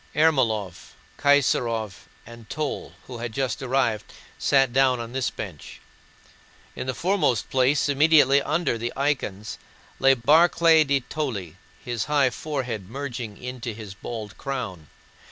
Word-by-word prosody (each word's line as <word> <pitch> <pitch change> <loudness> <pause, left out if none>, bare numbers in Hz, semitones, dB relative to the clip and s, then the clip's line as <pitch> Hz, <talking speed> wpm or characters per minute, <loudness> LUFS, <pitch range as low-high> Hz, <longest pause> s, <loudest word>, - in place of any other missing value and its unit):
Ermólov, 115 - +1 0.3
Kaysárov, 120 -6 +2 0.3
and 115 -1 -13
Toll, 155 -2 -4
who 125 -2 -8
had 120 0 -4
just 130 -2 -2
arrived, 125 -5 0 0.3
sat 135 -3 +3
down 130 -2 +3
on 115 0 -6
this 130 0 -1
bench. 90 -9 -8 1.0
In - - -5
the 130 - -2
foremost 175 - 0
place, 135 +3 +2
immediately 145 -1 +5
under 155 -5 -1
the 120 +1 -3
icons, 125 -8 -2 0.4
sat 135 -3 +3
Barclay 165 +1 +6
de 140 -2 +1
Tolly, 115 - -4 0.3
his 120 -2 -2
high 145 -3 +2
forehead 125 -8 -4
merging 120 -5 -6
into 125 -3 -6
his 105 -3 -8
bald 105 +1 -7
crown. 125 - -5
125 Hz, 130 wpm, -24 LUFS, 115-140 Hz, 1.0 s, Barclay